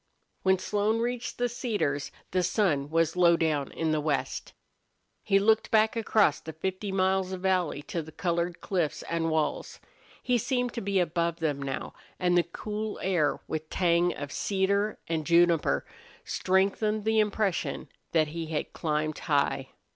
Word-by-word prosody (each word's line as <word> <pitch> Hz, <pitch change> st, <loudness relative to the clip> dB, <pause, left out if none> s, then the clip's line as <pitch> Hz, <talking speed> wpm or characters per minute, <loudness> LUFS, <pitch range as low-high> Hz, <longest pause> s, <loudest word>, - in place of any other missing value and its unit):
When 190 Hz, 0 st, +3 dB
Slone 205 Hz, +4 st, 0 dB
reached 245 Hz, +1 st, -2 dB
the 245 Hz, -, +1 dB
cedars 210 Hz, -, -2 dB, 0.2 s
the 185 Hz, -, +2 dB
sun 175 Hz, -7 st, +1 dB
was 165 Hz, +1 st, +1 dB
low 170 Hz, -1 st, +5 dB
down 150 Hz, -4 st, 0 dB
in 160 Hz, -1 st, -1 dB
the 155 Hz, -1 st, +1 dB
west. 150 Hz, -2 st, -2 dB, 0.7 s
He 195 Hz, -1 st, +3 dB
looked 220 Hz, +2 st, +3 dB
back 220 Hz, 0 st, +3 dB
across 215 Hz, -8 st, +3 dB
the 160 Hz, -, -8 dB
fifty 190 Hz, +5 st, -3 dB
miles 190 Hz, 0 st, +1 dB
of 185 Hz, -, -5 dB
valley 180 Hz, -6 st, 0 dB
to 170 Hz, -, -3 dB
the 160 Hz, 0 st, -11 dB
colored 170 Hz, 0 st, -2 dB
cliffs 175 Hz, -6 st, -1 dB
and 165 Hz, -1 st, -1 dB
walls. 155 Hz, -1 st, -1 dB, 0.4 s
He 250 Hz, -1 st, +2 dB
seemed 245 Hz, 0 st, -1 dB
to 235 Hz, -, -4 dB
be 200 Hz, -1 st, +1 dB
above 170 Hz, -1 st, 0 dB
them 155 Hz, -4 st, -2 dB
now, 135 Hz, -1 st, -4 dB, 0.2 s
and 180 Hz, -1 st, +2 dB
the 175 Hz, -, +6 dB
cool 210 Hz, +5 st, -5 dB
air, 175 Hz, -6 st, +1 dB
with 155 Hz, 0 st, -4 dB
tang 175 Hz, -1 st, +2 dB
of 145 Hz, -1 st, -6 dB
cedar 200 Hz, +2 st, 0 dB
and 160 Hz, -1 st, -1 dB
juniper, 170 Hz, -, +3 dB, 0.4 s
strengthened 200 Hz, +3 st, +1 dB
the 220 Hz, 0 st, +3 dB
impression 210 Hz, -3 st, 0 dB, 0.2 s
that 155 Hz, -2 st, +2 dB
he 165 Hz, +1 st, -5 dB
had 155 Hz, -1 st, -3 dB
climbed 155 Hz, -1 st, -1 dB
high. 140 Hz, -2 st, 0 dB
175 Hz, 160 wpm, -28 LUFS, 160-205 Hz, 0.7 s, the